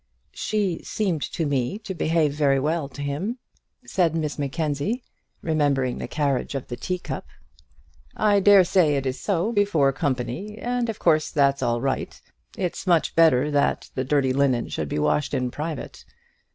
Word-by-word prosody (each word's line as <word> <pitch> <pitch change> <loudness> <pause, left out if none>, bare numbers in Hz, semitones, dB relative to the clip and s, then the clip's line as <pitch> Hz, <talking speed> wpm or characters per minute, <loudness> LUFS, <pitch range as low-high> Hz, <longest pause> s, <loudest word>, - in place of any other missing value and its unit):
"She 200 -6 -1
seemed 185 -8 -1
to 165 - -1
me 140 +5 -1
to 215 -3 -6
behave 160 -3 +1
very 140 -2 +2
well 150 +1 -1
to 145 - -7
him," 165 - -3 0.5
said 170 -4 +1
Miss 155 -2 -2
Mackenzie, 150 - -2 0.4
remembering 145 -5 +1
the - - -4
carriage 140 -3 -1
of 135 - -5
the 120 - -3
tea 180 +10 -3
cup. - - -6 0.9
"I 205 -1 +4
dare 200 -1 +7
say 175 -5 +3
it 135 -1 -1
is 130 0 -2
so 200 +2 0
before 200 -11 +2
company, 140 - -3
and 245 0 -1
of 220 - -3
course 155 -1 +2
that's 140 -1 +2
all 120 0 0
right; 135 0 -2 0.4
it's 185 0 -3
much 170 -3 +3
better 150 -3 +4
that 145 -1 0
the 130 - -1
dirty 135 -1 +1
linen 130 -3 +1
should 75 -2 -3
be - - -2
washed 75 0 +1
in 125 -1 -1
private. 155 +1 -6
150 Hz, 165 wpm, -24 LUFS, 135-180 Hz, 0.9 s, dare